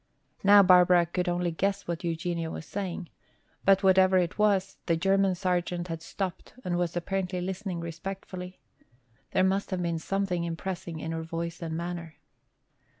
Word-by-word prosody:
Now 200 0 +8
Barbara 180 -1 +6
could 180 +2 -2
only 175 0 0
guess 195 +4 -1
what 170 0 -3
Eugenia 165 0 -2
was 160 - -6
saying. 185 -1 -4 0.5
But 195 0 +4
whatever 190 0 +5
it 180 +2 0
was, 195 -2 +2
the 165 -2 +2
German 195 +2 +2
sergeant 180 -1 -1
had 165 -1 -4
stopped 185 +1 -5
and 175 -1 0
was 175 0 -1
apparently 185 +1 -2
listening 185 -1 -4
respectfully. 180 +2 -6 0.7
There 185 - +2
must 190 +1 +1
have 185 -2 -2
been 170 -1 -1
something 195 0 -1
impressive 170 0 -4
in 160 +1 -4
her 165 0 -3
voice 165 +1 -5
and 160 -1 -3
manner. 170 -2 -5
180 Hz, 155 wpm, -28 LUFS, 170-190 Hz, 0.7 s, Now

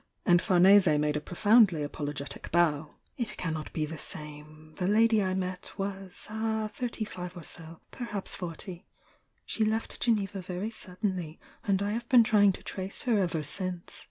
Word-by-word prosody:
"— - - -46
and 175 -1 +5
Farnese 185 -3 +6
made 150 0 +1
a 150 - -1
profoundly 200 -1 +4
apologetic 145 -1 -5
bow— 155 -3 +2 0.2
"it 235 - -3
cannot 160 -3 -3
be 155 - -1
the 155 0 -7
same. 155 +1 -8
The 180 - 0
lady 220 +1 +4
I 185 -1 0
met 185 -1 -4
was— 195 -2 -5
ah! 220 0 -2
— - - -31
thirty 245 -5 -3
five 180 -2 -7
or 170 - -8
so 165 0 -7
— - - -43
perhaps 210 -6 -2
forty. 175 0 -6 0.6
She 220 - 0
left 220 +1 -1
Geneva 205 -4 0
very 185 +4 -4
suddenly, 185 -5 -3 0.3
and 200 -2 +2
I 205 - -1
have 235 +2 -4
been 245 -3 +7
try 220 -2 +3
ing 200 -1 +7
to - - -9
trace 190 0 -5
her 230 -5 +2
ever 170 -5 0
since." 180 +3 -2
185 Hz, 185 wpm, -29 LUFS, 165-210 Hz, 0.6 s, been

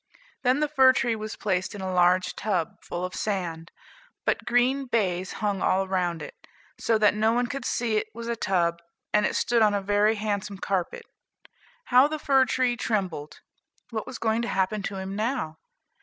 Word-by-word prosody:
Then 255 +3 +2
the 300 - +2
fir 265 -3 +5
tree 235 -2 0
was 215 0 -6
placed 185 -1 -1
in 200 - -7
a 190 -1 -3
large 180 +1 +3
tub, 185 -6 -2
full 175 +1 -4
of 185 - -6
sand; 170 -6 -3 0.6
but - - 0
green 255 +3 +2
baize 190 -6 0
hung 205 -3 -2
all 190 +1 +2
around 180 -3 -1
it, - - -8 0.5
so 225 - +2
that 210 -1 +4
no 220 +2 +2
one 245 +1 +1
could 275 0 -5
see 230 -3 0
it 215 - -1
was 230 +1 -7
a 235 - -1
tub, 175 -5 0 0.3
and 210 0 +4
it - - -4
stood 235 -1 +2
on 210 -1 +4
a - - +1
very 205 +2 +3
handsome 205 -1 -3
carpet. 195 - -2 0.8
How 255 - +5
the 310 +1 -3
fir 275 -3 +3
tree 250 0 +1
trembled! 190 -11 -3 0.5
"What 220 0 -4
was 255 -1 -6
going 225 0 0
to 235 - -2
happen 195 +1 0
to 200 0 -4
him 190 +1 -5
now?" 215 - -2
210 Hz, 190 wpm, -26 LUFS, 190-240 Hz, 0.8 s, fir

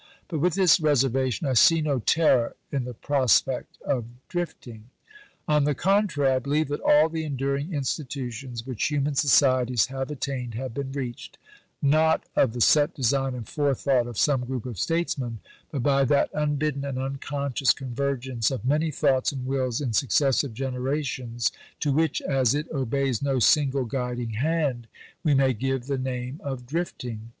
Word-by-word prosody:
But 160 -4 -2
with 180 +3 +1
this 185 -5 +5
reservation, 135 -3 +1
I 135 - +1
see 165 +7 +6
no 145 -4 0
terror 130 -2 +2 0.2
in 135 -3 -1
the 125 - -6
prospect 130 -4 +1
of 125 -5 -1 0.2
'drifting.' 125 -11 -5 0.6
On 150 -1 +3
the 145 0 +1
contrary, 185 -6 +2
I 130 - +1
believe 145 +3 0
that 145 - -3
all 150 +2 +5
the 160 0 -4
enduring 140 +2 -2
institutions 130 -4 -4
which 130 -5 -2
human 145 -1 0
societies 130 -4 +3
have 135 0 -3
attained 130 -5 -4
have 130 0 -5
been 135 +1 -4
reached, 130 -4 -6 0.5
not 155 +3 +3
of 120 -5 +3
the 120 - -4
set 145 +5 +4
design 135 0 0
and 120 -3 -7
forethought 135 -3 +1
of 120 -3 -8
some 135 -4 +2
group 125 -2 -4
of 120 -8 -6
statesmen, 140 - -1 0.3
but 135 -5 -3
by 140 0 +3
that 140 +2 +2
unbidden 150 -1 -1
and 140 -2 -4
unconscious 135 0 -1
convergence 130 -2 -2
of 130 -4 -5
many 150 +4 +1
thoughts 135 -3 +1
and 130 -3 -6
wills 130 -1 -1
in 125 -5 -2
successive 135 0 +2
generations, 130 -2 -2 0.3
to 145 - 0
which, 160 +3 +1
as 135 -2 +2
it 150 +1 -2
obeys 135 -3 -1
no 140 -1 0
single 135 +1 +3
guiding 125 -1 -3
hand, 135 -1 -1 0.4
we 150 -4 +3
may 135 -1 +3
give 130 +2 -2
the 135 -1 -2
name 130 +2 -4
of 130 -3 -5
'drifting.' 120 -7 -4
135 Hz, 160 wpm, -25 LUFS, 125-145 Hz, 0.6 s, see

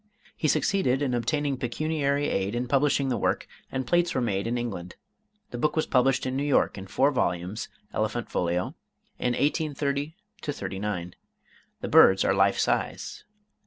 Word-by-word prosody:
He 155 - 0
succeeded 145 -3 +2
in 130 -3 0
obtaining 140 +3 0
pecuniary 145 +3 0
aid 100 +3 -1
in 125 +1 -1
publishing 140 0 +2
the 120 -4 0
work, - - 0 0.3
and 130 -1 -2
plates 175 +4 +2
were - - +2
made 100 -4 -1
in 120 +1 0
England. 95 -7 -5 0.6
The 120 - -5
book 150 +3 +1
was 155 - +1
published 130 0 +2
in 130 0 -2
New 135 - 0
York 145 -1 +2
in 95 -1 -8
four 135 +8 +2
volumes 90 -4 -1 0.2
(elephant - - -1
folio) 90 +1 -1 0.5
in 125 - +1
1830 145 +1 -1 0.3
39. 100 - -4 0.7
The - - -3
birds 95 0 +6
are - - +3
life 95 0 +3
size. - - -1
130 Hz, 160 wpm, -27 LUFS, 100-145 Hz, 0.7 s, birds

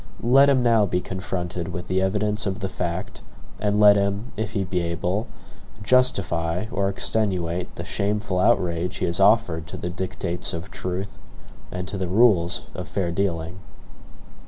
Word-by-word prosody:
Let 135 +4 +6
him 130 -3 +3
now 115 -4 +4
be 90 - 0
confronted 90 -2 -4
with 90 -1 -6
the 95 +1 +1
evidence 105 +2 0
of 95 -1 -2
the 95 - -2
fact, 90 0 -4 0.4
and 105 0 +1
let 105 -1 +7
him, 100 +4 -1
if 110 0 -3
he 100 -3 0
be 90 0 -1
able, 90 +5 -2 0.6
justify 100 -7 +2
or 100 -2 0
extenuate 90 -5 -1
the - - -6
shameful 100 -2 -1
outrage 90 -4 +1
he - - -1
has 85 +1 -1
offered 95 -6 +3
to - - -7
the 90 - -4
dictates 90 -1 -3
of 85 +3 -6
truth 95 +2 -5 0.5
and 90 0 -4
to 95 - -4
the 95 - -1
rules 90 -4 +3
of - - -6
fair 90 -4 -2
dealing. 85 -2 -2
95 Hz, 160 wpm, -24 LUFS, 90-105 Hz, 0.6 s, let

